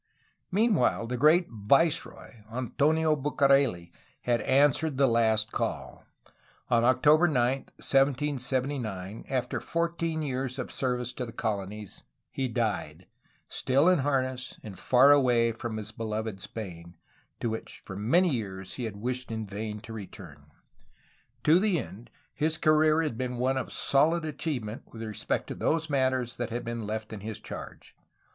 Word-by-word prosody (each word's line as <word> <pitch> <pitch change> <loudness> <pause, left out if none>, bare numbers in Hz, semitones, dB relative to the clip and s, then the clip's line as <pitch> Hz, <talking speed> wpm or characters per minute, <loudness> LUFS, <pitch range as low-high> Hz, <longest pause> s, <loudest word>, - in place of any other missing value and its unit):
Meanwhile, 200 - +2
the 125 +2 -3
great 155 +8 +5
viceroy, 135 +5 0
Antonio 150 +6 +1
Bucareli, 135 - +2 0.3
had 120 -2 +1
answered 140 +3 +3
the 140 - +5
last 110 -3 +2
call. - - -4 0.7
On 115 -1 +4
April 150 +7 +5
9, - - -3
1779, 130 -4 -1
after 130 -2 -1
fourteen 165 -1 -2
years 130 -2 -2
of 125 - -5
service 125 -2 -2
in 125 - -4
the - - -7
colonies, 105 -3 -4 0.3
he 135 - -1
died, 115 -3 -2 0.4
still 140 +5 +2
in 185 -3 +5
harness 130 -2 -1
and 95 -4 -9
far 130 +7 +6
away 125 -5 +4
from 115 0 -5
his 110 0 -6
beloved 110 -2 -4
Spain, 85 -5 -8 0.4
to 115 - -1
which 110 - -7
for 95 - -7
many 165 - +3
years 95 -6 -4
he 125 - -3
had 105 -3 -6
wished 125 +3 -3
in 110 -1 -3
vain 105 +1 -5
to 110 +1 -9
return. 90 -9 -10 1.0
To 160 +4 +6
the 200 -3 +2
end, 115 -4 -7 0.2
his 155 +2 0
career 155 0 +4
had 120 -8 -3
been 125 -1 -2
one 130 +2 +1
of 130 - -3
solid 160 +4 +2
achievement 130 -7 -3
with 115 -1 -8
respect 110 -2 -2
to - - -3
those 160 -1 -1
matters 130 -3 0
that 120 -2 -2
had 120 +2 -4
been 115 -2 -4
left 110 +1 -4
in 105 - -6
his 110 +1 -6
charge. - - -9
125 Hz, 150 wpm, -28 LUFS, 110-145 Hz, 1.0 s, far